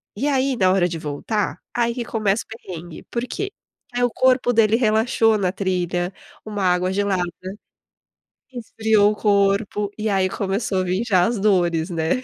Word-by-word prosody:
E 270 +8 -1
aí 270 -1 +1
na 185 -4 +3
hora 180 -2 +3
de 165 -2 -5
voltar, 160 +8 -2 0.2
aí 235 0 +1
que 240 -2 -3
começa 215 -1 0
o - - -58
perrengue, 175 -2 -9
por 235 0 -2
quê? 400 0 -4 0.4
Aí 245 0 0
o 245 - +3
corpo 255 -1 +3
dele 225 -2 +4
relaxou 225 -1 +2
na 185 -3 0
trilha, 180 -1 -1 0.3
uma 210 -2 -3
água 180 0 +2
gelada, 195 -2 0 1.3
esfriou 220 -3 +2
o - - -4
corpo 200 0 +1
e 215 0 -2
aí 190 -1 +1
começou 195 0 -1
a - - -1
vir 185 +5 -1
já 185 -5 +4
as 230 -1 -1
dores, 175 -4 +2
né. 170 +9 -1
205 Hz, 170 wpm, -22 LUFS, 185-225 Hz, 1.3 s, dele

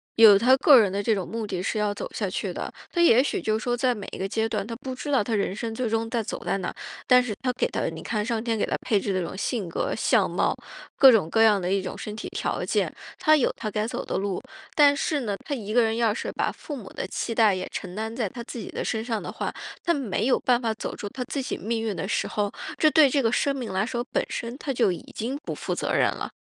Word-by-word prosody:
有 220 -3 +9
他 255 +5 +5
个 270 -2 +8
人 200 -4 +3
的 200 +1 -2
这 225 - +3
种 195 -4 -2
目 225 0 -4
的 185 -3 -3
是 205 - -2
要 210 -1 +1
走 - - -6
下 - - -2
去 - - -3
的。 - - -5 0.2
他 345 - -2
也 255 -8 +6
许 280 - -1
就 215 0 0
说 245 +1 -1
在 250 0 +2
每 205 -3 -8
一 - - -6
个 195 - -2
阶 220 +3 -1
段， 210 -3 -2
他 230 +1 -5
不 260 +1 -6
知 290 +3 -5
道 255 -7 +3
他 225 -1 -1
人 200 -1 -1
生 225 0 -4
最 245 0 -1
终 225 +1 -1
在 230 -2 -1
走 - - -5
在 - - 0
哪， 185 -2 -4 0.3
但 250 0 +6
是 215 -4 -4
他 250 -1 +1
给 - - 0
他， - - -2
你 - - -8
看 210 -2 -2
上 230 -1 -1
天 230 -2 0
给 - - +1
他 - - -1
配 210 -5 +2
置 195 - -2
的 185 - +1
这 175 - -2
种 - - -7
性 205 -5 -2
格、 - - -2
相 - - +3
貌， - - 0 0.4
各 270 -2 +9
种 195 -8 +3
各 225 +3 +4
样 210 -3 +5
的 180 - -1
一 195 -1 +1
种 185 - -5
身 210 - -6
体 220 - -6
条 - - -2
件， - - 0 0.3
他 310 0 +5
有 260 - +1
他 215 - -4
该 210 +1 -1
走 - - -4
的 - - -2
路。 195 -2 -2 0.3
但 285 -1 +5
是 300 0 0
呢， 210 -6 -2
他 290 - -3
一 215 -5 -4
个 240 +1 +4
人 225 0 +1
要 230 -2 +2
是 215 - -3
把 - - -1
父 295 - -7
母 225 -8 -9
的 - - -4
期 230 +4 -3
待 220 -4 +5
也 185 0 -4
承 180 -2 -5
担 220 +2 -4
在 235 -4 -1
他 235 +5 -8
自 245 - -8
己 230 - -6
的 - - -4
身 220 +1 -2
上 225 -3 -2
的 - - -6
话， - - -4 0.3
他 340 - +3
没 220 -7 -1
有 260 - +3
办 245 -1 +2
法 230 -3 -1
走 - - -5
出 205 - -6
他 250 +4 -5
自 275 0 -3
己 275 - -3
命 225 +4 -2
运 215 -3 -2
的 190 - -3
时 - - 0
候， 205 -1 -1 0.3
这 310 - +6
对 305 -1 +6
这 275 +1 +2
个 225 -2 +2
生 275 +2 +1
命 245 -6 -4
来 190 +2 0
说， 240 -1 -2
本 - - +1
身 235 +2 -4
他 275 -2 -3
就 230 -6 +3
已 175 - -7
经 250 +6 -3
不 - - -4
负 - - -3
责 - - -2
任 - - +4
了。 - - -5
225 Hz, 315 characters per minute, -25 LUFS, 205-250 Hz, 0.4 s, 有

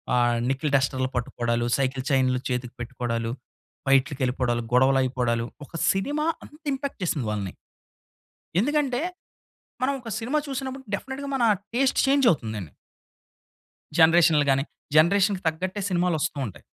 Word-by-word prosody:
ఆహ్, 120 -1 +3
nickel 135 +2 -1
డస్టర్‌లు 130 -1 +1
పట్టుకోడాలు, 120 -1 -1
cycle 130 -1 -1
చైన్‌లు 130 -2 +2
చేతికి 125 -1 -3
పెట్టుకోడాలు, 120 -1 -3 0.6
ఫైట్‌లకి 135 +1 +3
వెళ్ళిపోడాలు, 125 -2 0
గొడవలయిపోడాలు, 125 -2 +2 0.2
ఒక - - -24 0.2
సినిమా 290 +11 -1 0.2
అంత 300 - -16
ఇంపాక్ట్ 275 -1 -4
చేసింది 145 -9 -1
వాళ్ళని. 100 -3 -3 1.1
ఎందుకంటే, 280 0 +1 0.8
మనం 275 - +2
ఒక 230 - -8
సినిమా 270 +7 0
చూసినప్పుడు 265 0 -4
డెఫినిట్‌గా 275 +4 -6
మన 240 - +2 0.3
టేస్ట్ 265 +2 +2
చేంజ్ 275 -2 +4
అవుతుందని. 110 - -5 1.3
జనరేషన్‌లు 160 -2 +6
గాని, 135 0 +2 0.3
జనరేషన్‌కి 190 +4 +4
తగ్గట్టే 185 +5 -2
సినిమాలొస్తూ 175 -5 0
ఉంటయి. 100 - -9
140 Hz, 120 wpm, -25 LUFS, -, 1.3 s, జనరేషన్‌లు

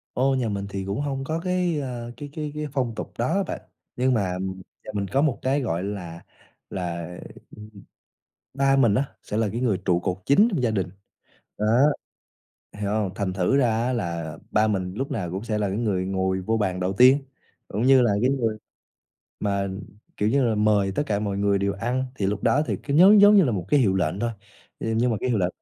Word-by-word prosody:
Ô, 135 +2 +2
nhà 125 -4 0
mình 100 -1 -3
thì 95 -1 -4
cũng 100 +6 -3
hông 135 -2 -3
có 160 +3 -2
cái, 180 -3 0
ờ, 120 -3 -5
cái 145 -1 -7
cái 150 -1 -5
cái 150 0 -3
phong 125 -5 -1
tục - - -6
đó 165 +12 +1
bạn, - - -5 0.4
nhưng 130 +1 +2
mà 100 -5 0 0.5
nhà - - -7
mình 100 -1 -2
có 135 +9 +1
một 145 -6 +1
cái, 135 +2 +1
gọi 90 -7 -2
là, 90 -5 -6 0.5
là 85 -2 -4 1.5
ba 135 0 +3
mình 120 -7 +4
á 135 +4 +2 0.2
sẽ 105 - -4
là 110 -2 +2
cái 115 +4 -3
người 110 -7 +1
trụ 90 -2 +3
cột 90 +1 -2
chính 200 +12 +5
trong 170 -10 -1
gia 115 - +2
đình, 95 -4 -1 0.7
đó, 105 - -1 1.1
hiểu 100 -1 -2
hông? 105 -3 0
Thành 100 -3 -2
thử 95 +8 +1
ra 115 -4 +2
á, 130 - 0
là 85 -8 -3
ba 110 +1 +3
mình 95 -3 -2
lúc 135 +7 -3
nào 90 -10 -3
cũng 95 +4 -5
sẽ 110 -2 -1
là 105 -2 0
cái 100 +3 -2
người 95 -5 0
ngồi 95 0 -1
vô 110 +5 0
bàn 95 -4 -1
đầu 90 +1 0
tiên, 130 +7 +6 0.5
cũng 105 - -2
như 130 0 +6
là 120 - +3
cái 125 +3 +3
người 115 -5 0 0.8
mà, 100 -1 0 0.5
kiểu 105 - +1
như 135 +3 +2
là, 115 -2 +1
mời 105 -2 +2
tất 145 - 0
cả 100 -1 0
mọi 100 -2 -2
người 100 0 +2
đều 100 0 0
ăn 120 +6 -2
thì 100 -7 -1
lúc 100 +1 -2
đó 145 +3 +3
thì - - -1
cứ 140 - -2
giống 195 +6 +8
giống 205 +1 +8
như 195 - +7
là 125 - +1
một 95 -5 -2
cái 145 - +4
hiệu 100 -6 +3
lệnh 90 +1 -1
thôi, 120 0 0 0.5
nh - - -5
nhưng 125 +1 +2
mà 110 - 0
cái 130 - -1
hiệu 115 - +1
lệnh 90 -2 +1
110 Hz, 225 wpm, -24 LUFS, 100-135 Hz, 1.5 s, giống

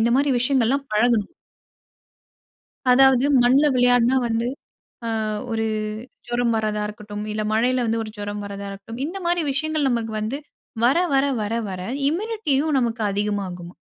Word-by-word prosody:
இந்த 230 +1 +3
மாதிரி 280 +1 +2
விஷயங்கள்லாம் 265 +2 +1
பழகணும். 220 0 +2 1.6
அதாவது 265 0 +5 0.2
மண்ணுல 265 +5 +4
விளையாடினா 245 0 +4
வந்து 230 0 0 0.8
ஆ - - -1 0.3
ஒரு 225 0 0 0.6
ஜுரம் 240 -1 +1
வரதா 215 -1 -1
இருக்கட்டும், 210 -1 -7
இல்ல 215 0 -2
மழையில 250 +3 +2
வந்து 225 0 0
ஒரு 215 - -8
ஜுரம் 205 0 -5
வரதா 200 0 -6
இருக்கட்டும், 200 +5 -8
இந்த 345 +6 -5
மாதிரி 345 -1 +1
விஷயங்கள் 310 0 0
நமக்கு 230 -3 -1
வந்து 230 +7 -3 0.5
வர 260 +6 +4 0.2
வர 270 0 +4 0.2
வர 210 +1 -2 0.2
வர 185 -1 -5 0.3
இம்யூனிட்டியும் 320 -6 0
நமக்கு 235 -2 -1
அதிகமாகுமாம். 195 -4 -3
235 Hz, 140 wpm, -23 LUFS, 210-270 Hz, 1.6 s, அதாவது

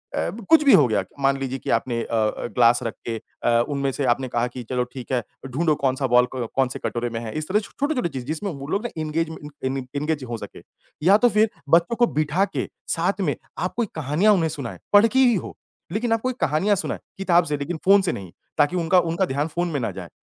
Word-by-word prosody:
अब 210 +3 -3
कुछ 320 -2 +7
भी 280 - +6
हो 140 -5 +7
गया 110 - +1
क - - -21
मान 135 0 +2
लीजिए 135 0 -3
कि - - -7
आपने 115 0 -3
अ - - -4
अ, 110 +1 0
गिलास 120 0 +4
रख 115 - -3
के 115 - -2 0.3
अ, 115 0 +3
उनमें 140 -1 -1
से 140 +1 -2
आपने 130 +1 +1
कहा 120 0 0
कि 125 0 -8
चलो 125 -1 0
ठीक 130 -1 -8
है, 125 -3 +1 0.2
ढूँढो 155 +4 +1
कौन-सा 130 +1 +1
बॉल 125 0 +4
क 120 -3 -2
कौन-से 135 -1 0
कटोरे 120 0 -2
में 115 0 -4
है, 115 -2 -6
इस 155 - -3
तरह 210 +3 +3
छोटे-छोटे 255 - -2
चीज़, 130 -4 -6
जिसमें 160 +8 -3
वो 140 -3 -8
लोग 200 +8 -1
ना - - -1
इंगेजमे 160 +1 -2 0.3
इन 135 +1 -2
इन 130 -1 -6
इंगेज़ 150 -1 -1
हो 120 -2 -4
सकें - - -10 0.4
या 195 +5 +6
तो 245 +2 +4
फिर 215 0 +3 0.2
बच्चों 170 +8 +4
को 240 0 +3
बिठा 155 +6 +1
के - - -1 0.3
साथ - - 0
में, - - 0 0.2
आप - - -2
कोई 235 -3 +1
कहानियाँ 160 +8 +3
उन्हें 165 -4 +1
सुनाएँ, 140 -7 -6
पढ़ 205 +3 +8
के 260 +3 +1
ही 245 -4 +5
हो, 180 - -5 0.4
लेकिन 225 +4 -1
आप 225 - 0
कोई 255 0 -1
कहानियाँ 160 +8 +2
सुनाएँ, 195 - -3 0.2
किताब 180 -2 +3
से 150 -2 -1
लेकिन 160 +4 -4
फ़ोन 200 +1 +7
से 180 -3 0
नहीं 95 -3 -7 0.3
ताकि 145 +4 +3
उनका 175 +2 +4
उनका 170 +2 0
ध्यान 145 -1 -1
फ़ोन 175 +3 -2
में 145 - -2
ना 115 -4 -2
जाए। 90 -2 -8
150 Hz, 245 wpm, -23 LUFS, 125-195 Hz, 0.4 s, पढ़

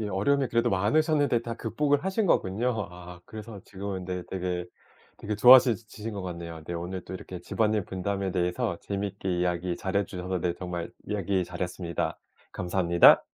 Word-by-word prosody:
예 105 - -2
어려움이 125 +8 +1
그래도 115 +1 +2
많으셨는데 140 - +2
다 115 0 -4
극복을 145 - 0
하신 195 +2 +1
거군요. 110 - +1
아 90 0 -11
그래서 110 -1 -9
지금은 95 -1 -5
근데 90 0 -3
되게 90 -1 -2 0.5
되게 105 - -3
좋아지 125 0 +8
지신 110 +1 -7
것 100 - -5
같네요. 85 -3 -6
네. - - -4
오늘 90 +2 -5
또 - - -9
이렇게 90 -1 -7
집안일 105 +2 0
분담에 95 +1 -2
대해서 90 +2 -1
재미있게 100 -2 -3
이야기 90 0 0
잘 95 +1 -3
해주셔서 95 -2 -2
네 85 0 0
정말 90 -1 -5 0.2
이야기 100 -2 0
잘 90 0 -9
했습니다. 90 -1 -3 0.3
감사합니다. 85 -1 +5
95 Hz, 395 characters per minute, -28 LUFS, 90-110 Hz, 0.5 s, 좋아지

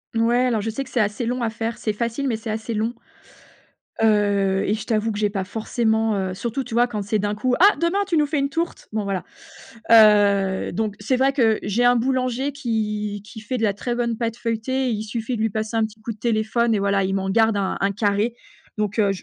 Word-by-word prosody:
Ouais, 240 +2 +3
alors 230 -3 +1
je 220 - -2
sais 250 +5 -3
que 265 - -14
c'est 245 - -1
assez 210 +3 0
long 245 +2 -2
à 230 - 0
faire. 225 +1 -4
C'est 215 - -2
facile, 235 +5 -2
mais 235 - 0
c'est 220 0 -7
assez 220 +1 -3
long. 220 +3 -1 1.1
Heu, 205 -3 +2
et 205 - +2
je 215 0 -4
t'avoue 220 0 0
que 205 - -4
j'ai 210 -1 +2
pas 195 -2 -2
forcément, 220 +1 0
heu, 190 -1 -2
surtout 235 +7 -3
tu 230 - -9
vois 240 +1 +4
quand 210 -4 -4
c'est 210 +2 0
d'un 205 +1 -1
coup: 250 +4 0
«Ah 400 +3 +7
demain 340 +4 +1
tu 335 -4 +1
nous 300 - +4
fais 295 0 -1
une 275 0 0
tourte». 330 +4 -3
Bon 215 -2 -1
voilà, 195 -2 -2 0.7
heu, 205 -3 +5
donc 210 +2 -2
c'est 250 +5 0
vrai 270 +1 +3
que 225 -6 +3
j'ai 205 +4 0
un 245 0 +5
boulanger 255 +2 0
qui 210 -6 -2
qui 220 0 -10
fait 250 +4 -3
de 225 - -2
la 205 -2 +2
très 240 +4 -3
bonne 235 -2 -1
pâte 230 -1 -2
feuilletée. 240 +3 -1
Il 215 0 -2
suffit 230 +2 -3
de 215 - -3
lui 225 - +2
passer 220 +2 -3
un 225 - +3
petit 215 0 -11
coup 230 - -4
de - - -20
téléphone 230 +1 +1
et - - 0
voilà, 200 -1 +1
il 190 +1 -1
m'en 195 0 -1
garde 220 0 +3
un 195 -1 -1
un 200 0 +2
carré, 205 +3 0 0.4
donc 210 +1 -1
heu, 200 -2 +3
je 195 - -5
220 Hz, 245 wpm, -22 LUFS, 210-240 Hz, 1.1 s, Ah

